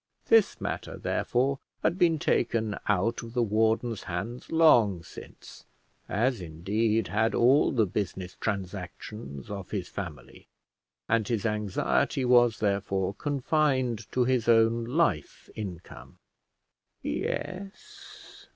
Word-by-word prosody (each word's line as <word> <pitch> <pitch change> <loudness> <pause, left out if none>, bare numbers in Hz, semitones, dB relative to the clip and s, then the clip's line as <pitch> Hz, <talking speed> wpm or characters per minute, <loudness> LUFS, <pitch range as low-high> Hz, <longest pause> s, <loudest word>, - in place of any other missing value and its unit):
This 225 -3 +4
matter, - - -4
therefore, 135 +3 0 0.2
had 175 +3 +1
been 170 -3 +4
taken 110 -6 0
out 105 +3 +1
of 115 0 -10
the 120 - +3
warden's 110 +1 +1
hands 100 +7 -5
long 115 - +5
since, - - -13 0.4
as, 120 +2 0
indeed, 100 +7 -1
had 110 +4 +1
all 130 +5 +4
the 115 -5 +2
business 95 -1 -4
transactions 95 - -5
of 100 -2 -6
his 95 -4 -4
family, 80 -10 -8 0.6
and 110 -2 +1
his 115 -2 -1
anxiety 105 - 0
was, 120 -2 +5
therefore, 100 -2 0
confined 130 -4 0
to 125 - +2
his 125 -2 +1
own 115 0 +4
life 125 - -1
income. 95 -5 -8 0.9
Yes. 395 - -6
110 Hz, 115 wpm, -28 LUFS, 100-125 Hz, 0.9 s, long